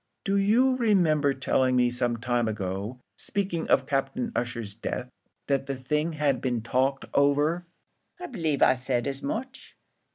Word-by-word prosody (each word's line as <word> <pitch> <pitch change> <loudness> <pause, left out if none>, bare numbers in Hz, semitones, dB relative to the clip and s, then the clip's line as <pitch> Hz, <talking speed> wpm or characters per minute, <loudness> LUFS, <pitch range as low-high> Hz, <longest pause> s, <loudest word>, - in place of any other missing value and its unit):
"Do 195 - 0
you 235 +7 +3
remember 170 - +3
telling 130 -1 +1
me 125 -1 +3
some 120 -1 -1
time 120 0 0
ago, 100 +3 -4 0.2
speaking 190 -5 -2
of 130 - +4
Captain 155 - -1
Ussher's 120 -4 -3
death, 125 +3 -5 0.3
that 135 -1 0
the 140 - -2
thing 150 +5 -1
had 145 -5 0
been 120 -4 -1
talked 130 +3 0
over?" 145 +5 +2 0.5
"I 360 - -6
b'lieve 160 - 0
I - - +6
said 125 -1 -1
as 140 0 -3
much." 250 - -5
140 Hz, 155 wpm, -27 LUFS, 125-170 Hz, 0.5 s, I